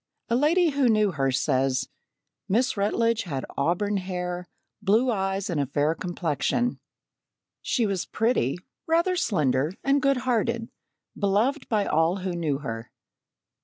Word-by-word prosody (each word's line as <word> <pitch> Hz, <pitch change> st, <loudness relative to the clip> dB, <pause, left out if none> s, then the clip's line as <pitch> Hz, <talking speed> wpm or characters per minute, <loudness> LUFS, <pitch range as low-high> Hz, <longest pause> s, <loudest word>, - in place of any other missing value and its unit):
A 235 Hz, -, +2 dB
lady 325 Hz, +6 st, +3 dB
who 275 Hz, -3 st, +2 dB
knew 215 Hz, -2 st, +3 dB
her 135 Hz, -4 st, 0 dB
says: 130 Hz, -1 st, +1 dB, 0.6 s
"Miss 245 Hz, +7 st, +2 dB
Rutledge 225 Hz, +3 st, +1 dB
had 140 Hz, -7 st, -4 dB
auburn 180 Hz, +8 st, 0 dB
hair, 180 Hz, -1 st, -4 dB, 0.3 s
blue 230 Hz, +6 st, +3 dB
eyes, 195 Hz, -1 st, -1 dB
and 165 Hz, -7 st, 0 dB
a 140 Hz, -, -1 dB
fair 145 Hz, +3 st, +1 dB
complexion. 175 Hz, -, -1 dB, 0.8 s
She 240 Hz, -, +1 dB
was 195 Hz, -3 st, -2 dB
pretty, 225 Hz, -, +1 dB, 0.3 s
rather 340 Hz, +3 st, +2 dB
slender, 150 Hz, -, +1 dB
and 275 Hz, +1 st, +3 dB
good 275 Hz, 0 st, +3 dB
hearted, 235 Hz, -2 st, 0 dB, 0.5 s
beloved 215 Hz, +9 st, +1 dB
by 210 Hz, -3 st, +1 dB
all 165 Hz, +3 st, +2 dB
who 190 Hz, -1 st, -3 dB
knew 160 Hz, -5 st, -1 dB
her." 115 Hz, -5 st, -6 dB
195 Hz, 135 wpm, -26 LUFS, 155-235 Hz, 0.8 s, lady